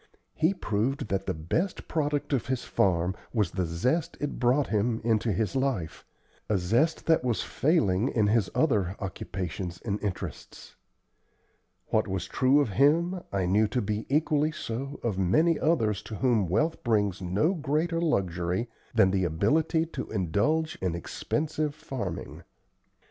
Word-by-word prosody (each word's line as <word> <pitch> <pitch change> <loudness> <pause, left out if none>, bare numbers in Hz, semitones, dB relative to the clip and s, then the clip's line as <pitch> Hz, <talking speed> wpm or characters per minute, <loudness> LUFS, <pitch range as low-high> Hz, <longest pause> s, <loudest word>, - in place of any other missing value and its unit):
He 165 +5 +1
proved 125 - -1
that 95 0 -1
the - - 0
best 160 - -2
product 145 -2 -1
of 130 - 0
his 130 -2 -1
farm 90 0 +1 0.2
was 105 -6 +1
the 90 -1 -1
zest 130 - -1
it 145 - -3
brought 130 +3 +3
him 110 +2 +1
into 115 0 +1
his 110 +6 -1
life 130 -12 -1 0.4
a 105 - +3
zest 115 - +1
that 160 -5 +3
was 120 -3 0
failing 120 - +2
in 110 -3 +2
his 105 -1 +2
other 105 - +2
occupations 90 -2 -5
and 105 -2 -2
interests. 100 -4 -6 1.1
What - - +2
was 95 -2 -2
true 130 +8 +3
of 140 - 0
him 165 - +3
I 95 -2 0
knew 105 +4 +3
to 125 +4 -1
be 105 0 -2
equally 150 +1 +2
so 135 -1 -5
of 105 -5 -1
many 155 - +3
others 115 - +1
to 110 - -5
whom 110 -6 +2
wealth 155 - 0
brings 105 -5 +1
no 100 - +1
greater 165 +1 0
luxury 95 - 0 0.3
than 95 - +5
the 95 -1 +1
ability 150 - +1
to 165 - -6
indulge 110 - 0
in 90 -3 -1
expensive 150 - -2
farming. 130 - -5
115 Hz, 150 wpm, -28 LUFS, 95-150 Hz, 1.1 s, than